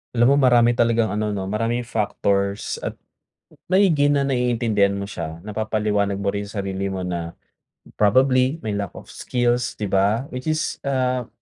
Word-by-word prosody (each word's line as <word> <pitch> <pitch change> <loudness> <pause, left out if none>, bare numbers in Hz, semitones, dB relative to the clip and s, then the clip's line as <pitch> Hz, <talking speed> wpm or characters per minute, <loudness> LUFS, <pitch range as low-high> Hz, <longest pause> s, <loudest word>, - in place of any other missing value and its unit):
Alam 120 +3 +4
mo - - +5
marami 120 -1 +5
talagang 115 -3 +2
ano 105 0 -1
'no, 95 - -3
maraming 115 +5 -1
factors 100 -2 -1
at - - -5 0.7
maigi 175 -7 +4
na 140 -1 +2
naiintindihan 120 -6 +1
mo 100 - -4
siya. 80 -5 -6
Napapaliwanag 105 -2 -1
mo 100 0 -1
rin 100 - -2
sa 105 - -8
sarili 95 0 -2
mo 95 -1 -4
na 85 -1 -4 0.6
probably, 130 +6 +3
may 110 - -2
lack 100 -1 -2
of - - -11
skills, 120 -1 -1
'di 105 - -4
ba? 100 +6 +2
Which 125 +3 -5
is, 155 0 -1
ah, 130 -3 -1
110 Hz, 165 wpm, -22 LUFS, 100-125 Hz, 0.7 s, mo